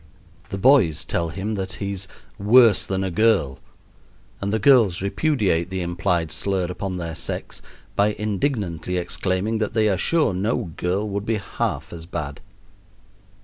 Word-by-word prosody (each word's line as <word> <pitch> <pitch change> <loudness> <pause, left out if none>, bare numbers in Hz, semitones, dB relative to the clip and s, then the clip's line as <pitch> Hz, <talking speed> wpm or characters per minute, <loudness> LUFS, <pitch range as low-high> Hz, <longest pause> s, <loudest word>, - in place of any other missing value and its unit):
The 100 - -4
boys 95 - +4
tell 85 0 -1
him 100 +6 -4
that 95 -2 -3
he's 100 -1 -4 0.3
"worse 110 +1 +5
than 95 0 -1
a 95 - -2
girl," 85 -9 +2 0.8
and 100 0 -1
the 110 - +2
girls 110 -6 +5
repudiate 100 - +1
the 95 -1 -3
implied 85 -2 -1
slur 95 +2 -1
upon 90 +1 -4
their 85 -2 -4
sex - - -5 0.3
by 105 +1 +3
indignantly 100 - -2
exclaiming 95 +4 -1
that 110 +1 -2
they 110 -1 +3
are 95 - 0
sure 160 - +2
no 100 0 -1
girl 95 +4 -1
would 100 0 -4
be 115 - +1
half 100 -3 -3
as 80 -1 -9
bad. 70 -5 -5
95 Hz, 150 wpm, -23 LUFS, 90-110 Hz, 0.8 s, worse